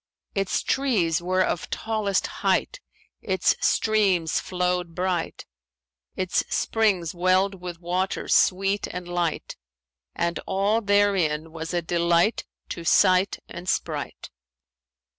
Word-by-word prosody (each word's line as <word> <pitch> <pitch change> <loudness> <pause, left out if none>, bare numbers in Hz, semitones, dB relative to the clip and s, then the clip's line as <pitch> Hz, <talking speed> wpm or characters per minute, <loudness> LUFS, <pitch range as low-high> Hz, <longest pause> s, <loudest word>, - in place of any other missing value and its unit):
Its 195 -1 -1
trees 190 -12 +1
were 185 +1 +1
of 175 - -2
tallest 215 -3 -1 0.2
height; - - 0 0.4
its 190 -3 +1
streams 195 -7 +2
flowed 180 -2 -2
bright; 180 -2 -2 0.7
its 185 -1 0
springs 200 -7 +1
welled 185 +2 +1
with 175 -2 -7
waters 180 +2 -1
sweet 195 +2 +2
and 180 0 -7
light; 175 -2 -2 0.6
and 170 0 -1
all 200 +4 +1
therein 195 -7 +1
was 160 0 -6
a 175 -1 -1
delight 170 +4 +1 0.2
to 170 - -6
sight 185 +3 +4
and 175 +1 -7
sprite. - - -3
185 Hz, 110 wpm, -25 LUFS, 170-195 Hz, 0.7 s, sight